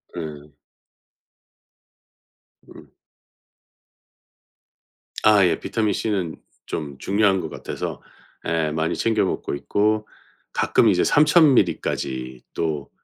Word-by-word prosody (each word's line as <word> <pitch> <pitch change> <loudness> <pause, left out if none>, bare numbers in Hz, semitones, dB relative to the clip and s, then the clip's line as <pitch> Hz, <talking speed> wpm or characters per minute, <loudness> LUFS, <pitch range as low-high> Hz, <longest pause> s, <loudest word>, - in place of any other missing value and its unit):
네. 75 -3 -7 2.2
음. - - -15 2.3
아 105 -2 +6
예. 85 -2 +1
비타민 110 -3 -1
C는 95 -6 -2 0.3
좀 70 -3 -5
중요한 100 +2 +2
것 80 - -5
같아서 - - -6 0.4
예 80 -1 0
많이 80 +1 -1
챙겨 110 -3 +1
먹고 95 - -3
있고 105 +8 0 0.5
가끔 - - +3
이제 - - +3
3,000 150 0 +5
밀리까지 65 - -1
또 75 -4 -3
90 Hz, 160 characters per minute, -23 LUFS, 75-105 Hz, 2.3 s, 아